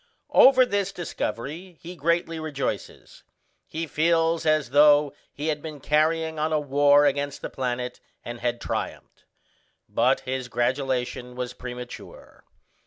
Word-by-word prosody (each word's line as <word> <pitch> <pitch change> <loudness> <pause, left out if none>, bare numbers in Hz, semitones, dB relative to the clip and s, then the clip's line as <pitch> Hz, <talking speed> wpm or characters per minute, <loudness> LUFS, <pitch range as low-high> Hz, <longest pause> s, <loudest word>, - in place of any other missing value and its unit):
Over 260 -1 +7
this 200 -3 -1
discovery 170 0 -5
he 175 +2 -9
greatly 165 +1 0
rejoices. 150 -3 -5 0.5
He 165 +1 -4
feels 165 +1 +1
as 155 -4 +2
though 145 0 +5 0.2
he 150 +2 -4
had 150 -1 -2
been 155 -2 -7
carrying 160 +2 +1
on 155 +1 0
a 155 - +2
war 145 0 +4
against 145 0 -1
the - - -5
planet 125 -1 -3 0.3
and 120 0 -6
had 120 0 -1
triumphed; - - -5 0.6
but - - +2
his 130 -1 -4
gratulation 125 0 -2
was 125 0 -4
premature. 125 -1 -10
145 Hz, 130 wpm, -25 LUFS, 130-160 Hz, 0.6 s, Over